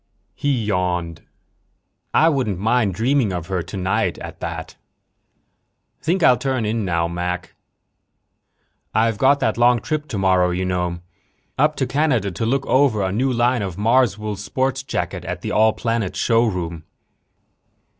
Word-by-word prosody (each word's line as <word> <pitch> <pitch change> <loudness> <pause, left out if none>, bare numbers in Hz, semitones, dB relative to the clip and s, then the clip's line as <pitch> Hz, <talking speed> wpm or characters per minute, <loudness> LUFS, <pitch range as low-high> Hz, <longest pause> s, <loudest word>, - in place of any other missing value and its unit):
He 135 -6 -1
yawned. 90 -4 -1 0.9
"I 160 - +4
wouldn't 130 - 0
mind 110 -1 +1
dreaming 120 +1 +1
of 90 -3 -4
her 95 -2 -1
tonight, 95 +1 -1
at - - -9
that. - - -6 1.3
Think 175 +2 0
I'll 125 -5 +5
turn 130 -3 -1
in 110 +1 -1
now, 85 -3 0
Mac. 90 +1 -4 1.4
I've 110 -1 +2
got 140 +2 +4
that 110 +1 0
long 120 0 +5
trip 155 +2 -3
tomorrow, 95 -3 +2
you 90 +1 -1
know. 90 -1 -2 0.5
Up 150 +3 +2
to 130 - 0
Canada 130 -6 +1
to 100 +6 -3
look 135 +3 0
over 130 -7 +3
a 95 - -1
new 130 +7 +1
line 120 0 +2
of 95 -4 -4
Marswool 110 -2 +1
sport 130 +5 -1
jackets - - -3
at - - -4
the - - -4
All 110 +1 +4
Planets 115 -5 -2
Showroom." 90 -9 0
110 Hz, 145 wpm, -21 LUFS, 90-130 Hz, 1.4 s, I'll